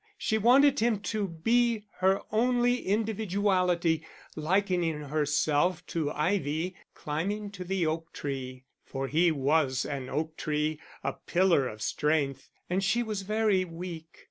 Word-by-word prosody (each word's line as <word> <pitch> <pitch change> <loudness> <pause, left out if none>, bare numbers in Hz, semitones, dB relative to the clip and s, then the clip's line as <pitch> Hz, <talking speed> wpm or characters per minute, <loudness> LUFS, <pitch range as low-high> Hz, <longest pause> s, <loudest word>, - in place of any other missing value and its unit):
She 220 - 0
wanted 265 +6 +5
him 225 -2 +2
to 210 -2 0
be 225 +6 +1 0.2
her 190 +1 +3
only 245 +1 +2
individuality, 190 -6 +1 0.3
likening 175 -1 +1
herself 150 +3 +1
to 160 -3 -2
ivy 160 +1 -1 0.2
climbing 200 +8 -3
to 190 -2 -7
the 185 -1 -1
oak 165 +1 -2
tree; 130 -2 -5 0.2
for 135 0 -4
he 165 +5 +3
was 140 -3 +1
an 135 -3 -4
oak 155 +1 -3
tree, 150 0 -1 0.2
a - - -1
pillar 175 -7 +2
of 110 -2 -7
strength, 145 -2 0 0.2
and 185 +2 0
she 235 +5 +2
was 215 -3 -3
very 210 -1 +2
weak. 165 -2 -8
175 Hz, 135 wpm, -29 LUFS, 150-205 Hz, 0.3 s, wanted